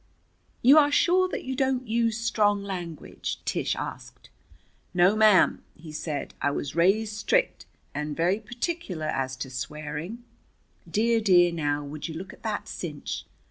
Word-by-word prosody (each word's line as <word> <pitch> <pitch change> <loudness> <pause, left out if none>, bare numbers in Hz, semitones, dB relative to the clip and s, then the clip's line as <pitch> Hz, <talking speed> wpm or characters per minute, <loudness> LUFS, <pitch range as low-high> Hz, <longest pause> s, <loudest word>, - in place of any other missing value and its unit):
"You 275 +6 +8
are 290 -1 +4
sure 365 +4 +4
that - - -4
you 260 0 -3
don't 260 -2 0
use 230 0 +1
strong 210 -3 +1
language?" 175 -5 -5
Tish - - 0
asked. - - -8 0.6
"No, 180 +3 +5
ma'am," 215 -3 +5
he 160 -1 -11
said. 155 -1 -4
"I - - +2
was 140 0 -4
raised 205 +6 +3
strict, - - 0 0.3
and 150 0 -4
very 180 +5 +2
particular 235 - -4
as 130 -3 -1
to 130 0 -6
swearing. 150 - -5 0.7
Dear, 230 +1 +2
dear 175 -4 +5
now, 145 -3 -1
would 145 +3 -6
you 160 - -7
look 185 +3 -7
at - - -17
that 215 -2 -3
cinch! 150 -5 -5
190 Hz, 150 wpm, -27 LUFS, 155-230 Hz, 0.7 s, You